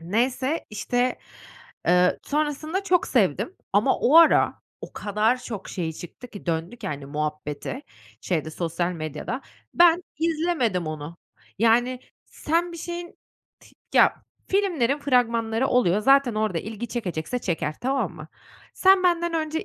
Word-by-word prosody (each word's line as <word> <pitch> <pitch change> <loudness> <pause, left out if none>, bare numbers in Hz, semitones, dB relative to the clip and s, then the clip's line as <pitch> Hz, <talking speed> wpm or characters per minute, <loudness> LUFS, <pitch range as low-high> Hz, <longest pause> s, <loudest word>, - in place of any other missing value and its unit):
Neyse, 250 - -1
işte, 245 +4 -1 0.7
eee, 180 +1 +4
sonrasında 305 +5 -1
çok 360 -2 +2
sevdim 375 - +1 0.2
ama 210 +7 +3
o 285 +6 +4
ara 330 -1 +6 0.3
o - - -8
kadar 215 +4 +1
çok 220 -6 -7
şeyi 165 -4 -3
çıktı 175 +10 -10
ki 205 -4 -11
döndü 165 +7 -2
ki, 220 -4 -8
hani, 140 -3 -5
muhabbeti, 150 - -4 0.4
şeyde, 160 -3 -2
sosyal 170 +2 -2
medyada. 155 - -5 0.3
Ben 345 0 +5 0.2
izlemedim 315 - 0
onu. 155 +1 -6 0.4
Yani 240 +3 +3 0.3
sen 340 +3 -1
bir 340 - -7
şeyin, 345 +1 -7 0.4
ti - - -20 0.2
Ya, - - +6 0.3
filmlerin 325 -10 +1
fragmanları 235 -3 +1
oluyor, 210 -6 +3
zaten 270 0 +4
orada 215 -6 0
ilgi 220 +5 -6
çekecekse 200 -2 -3
çeker, 160 -7 -2
tamam 255 -7 -1
mı? 155 -1 -10 0.5
Sen 380 0 +5
benden 345 -1 +1
önce 320 +2 -2
240 Hz, 135 wpm, -24 LUFS, -, 0.7 s, ara